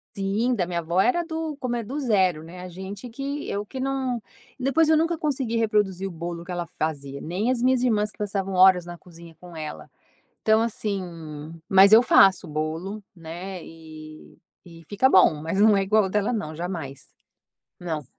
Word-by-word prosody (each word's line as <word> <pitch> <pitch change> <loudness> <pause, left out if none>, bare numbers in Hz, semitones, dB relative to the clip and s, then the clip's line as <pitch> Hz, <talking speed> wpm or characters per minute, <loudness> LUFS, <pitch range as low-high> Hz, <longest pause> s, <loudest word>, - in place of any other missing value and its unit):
Sim, 205 +6 0
da 180 -6 -1
minha 175 - -3
avó 170 +3 +1
era 345 - +1
do 320 -2 -4
como 245 -1 -2
é 235 - -2
do 270 +7 -5
0, 190 - +1
né, 175 +2 -11
a 185 - -7
gente 190 +6 -8
que 280 +4 -5
eu 205 +1 -3
que 260 +5 -8
não 260 -3 -2 0.4
depois 275 +5 +2
eu 315 - +5
nunca 330 +1 +1
consegui 265 -7 -1
reproduzir 205 -4 0
o 190 - -7
bolo 170 +1 -6
que 180 - -7
ela 175 -1 -3
fazia, 140 -3 -4
nem 190 - -2
as 245 -2 0
minhas 255 -1 +3
irmãs 215 -4 +1
que - - -18
passavam 195 -2 -2
horas 185 -1 +6
na 175 - -8
cozinha 170 -1 -15
com 175 -1 -12
ela. 155 -1 -7 0.5
Então 220 0 +4
assim, 215 -3 -2 0.7
mas 195 +2 +7
eu 225 - +9
faço 190 -6 +5
bolo, 160 +7 -4
né, 175 +2 -8
e 155 -1 -13 0.3
e 165 -2 -14
fica 210 +6 +3
bom 185 -8 +6
mas 165 +6 -2
não 215 -1 +6
é 195 - +2
igual 215 +1 +3
o - - -3
dela 210 +3 0
não 160 -9 -4
jamais, 165 -6 -6 0.7
não. 160 -5 -4
195 Hz, 190 wpm, -24 LUFS, 170-235 Hz, 0.7 s, eu